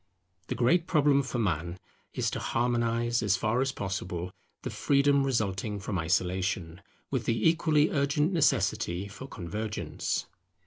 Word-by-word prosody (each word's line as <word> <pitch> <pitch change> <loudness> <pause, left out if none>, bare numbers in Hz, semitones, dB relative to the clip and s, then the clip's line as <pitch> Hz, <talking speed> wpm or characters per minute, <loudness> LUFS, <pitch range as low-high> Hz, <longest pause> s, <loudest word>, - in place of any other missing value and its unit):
The - - -2
great 165 +8 +3
problem 145 -3 +4
for 130 -2 -4
man 85 -5 -1 0.4
is - - 0
to - - -3
harmonize, 120 0 0
as 100 -4 +2
far 110 +6 +1
as 135 0 +1
possible, 90 -5 -4 0.3
the - - -4
freedom 140 0 +3
resulting 105 -5 -1
from 95 -1 -3
isolation, 90 0 -1 0.3
with - - -1
the 115 -1 +2
equally 160 -2 +3
urgent 145 +4 +1
necessity 100 - +1
for 105 +7 -9
convergence. 105 +1 -3
115 Hz, 135 wpm, -29 LUFS, 95-140 Hz, 0.4 s, problem